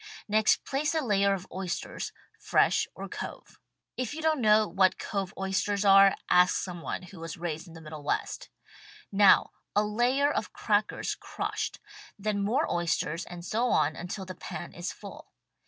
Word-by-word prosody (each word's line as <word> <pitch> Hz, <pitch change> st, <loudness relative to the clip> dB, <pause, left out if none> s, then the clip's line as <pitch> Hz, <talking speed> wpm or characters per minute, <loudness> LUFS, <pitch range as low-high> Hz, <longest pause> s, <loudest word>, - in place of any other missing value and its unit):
Next 215 Hz, 0 st, +3 dB
place 290 Hz, +3 st, -1 dB
a 315 Hz, -, +2 dB
layer 200 Hz, -6 st, +2 dB
of 185 Hz, -1 st, -8 dB
oysters, 185 Hz, -2 st, -4 dB, 0.3 s
fresh -, -, +3 dB
or -, -, -6 dB
cove. -, -, -8 dB, 0.4 s
If 255 Hz, +2 st, -3 dB
you 320 Hz, -, -5 dB
don't 315 Hz, -4 st, +2 dB
know 215 Hz, -1 st, +5 dB
what 190 Hz, -1 st, +3 dB
cove 195 Hz, -3 st, -3 dB
oysters 195 Hz, +1 st, 0 dB
are 195 Hz, 0 st, +7 dB
ask 180 Hz, 0 st, +5 dB
some 175 Hz, -2 st, -4 dB
one 185 Hz, -, -4 dB
who 180 Hz, 0 st, -12 dB
was 165 Hz, -1 st, -6 dB
raised 165 Hz, 0 st, -4 dB
in 165 Hz, -, -13 dB
the 165 Hz, -, -10 dB
Middle 155 Hz, -1 st, -8 dB
West. 145 Hz, -, -2 dB, 0.6 s
Now 200 Hz, 0 st, +6 dB, 0.2 s
a 210 Hz, -, +4 dB
layer' 245 Hz, +7 st, +2 dB
of -, -, -3 dB
crackers -, -, 0 dB
crushed; -, -, -4 dB, 0.4 s
then 205 Hz, 0 st, -1 dB
more 240 Hz, +10 st, +1 dB
oysters 170 Hz, -1 st, -1 dB
and 175 Hz, -1 st, -9 dB
so 230 Hz, +6 st, 0 dB
on 155 Hz, -9 st, +2 dB
until 185 Hz, +3 st, -5 dB
the 185 Hz, -, -7 dB
pan 180 Hz, -, -7 dB
is -, -, -4 dB
full. -, -, -11 dB
195 Hz, 170 wpm, -29 LUFS, 175-215 Hz, 0.6 s, are